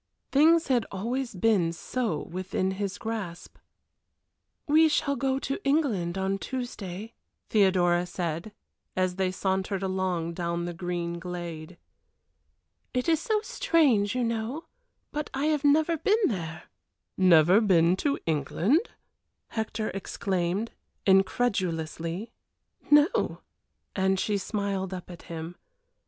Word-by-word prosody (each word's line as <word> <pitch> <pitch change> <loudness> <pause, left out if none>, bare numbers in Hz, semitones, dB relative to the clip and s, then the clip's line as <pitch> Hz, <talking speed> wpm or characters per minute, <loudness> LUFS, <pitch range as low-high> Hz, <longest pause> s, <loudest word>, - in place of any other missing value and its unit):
Things 325 +4 +5
had 245 -4 +2
always 240 +4 -3
been 185 -4 +2
so 175 -1 -2
within 185 +1 -2
his 195 0 -3
grasp. 210 -7 -5 1.1
"We 315 +2 +5
shall 280 -2 +1
go 265 +1 0
to 275 +7 -4
England 230 - +1
on 190 +1 -1
Tuesday," 225 -5 -5 0.4
Theodora 180 -4 +3
said, 175 +2 -3 0.4
as 185 0 0
they 190 -1 +1
sauntered 190 +1 -1
along 185 -3 -1
down 170 0 -2
the 175 - -4
green 170 0 -3
glade. 170 -1 -6 1.2
"It 250 - 0
is 325 -2 +3
so 430 +2 0
strange, 285 - +2
you 250 - +1
know, 230 +6 -2 0.5
but 300 0 -3
I 275 +2 0
have 295 -1 -1
never 315 +3 +4
been 420 +7 +2
there." 170 -5 -4 0.5
"Never 180 +2 +6
been 175 -4 +4
to 280 +6 0
England!" 170 - +1 0.6
Hector 220 -1 -2
exclaimed, 190 +1 -2 0.3
incredulously. 190 -2 +1 0.6
"No!" 295 +5 +4 0.5
and 190 0 +2
she 205 0 0
smiled 195 -2 -2
up 180 0 -9
at 175 - -10
him. 165 +1 -6
195 Hz, 115 wpm, -27 LUFS, 175-250 Hz, 1.2 s, Never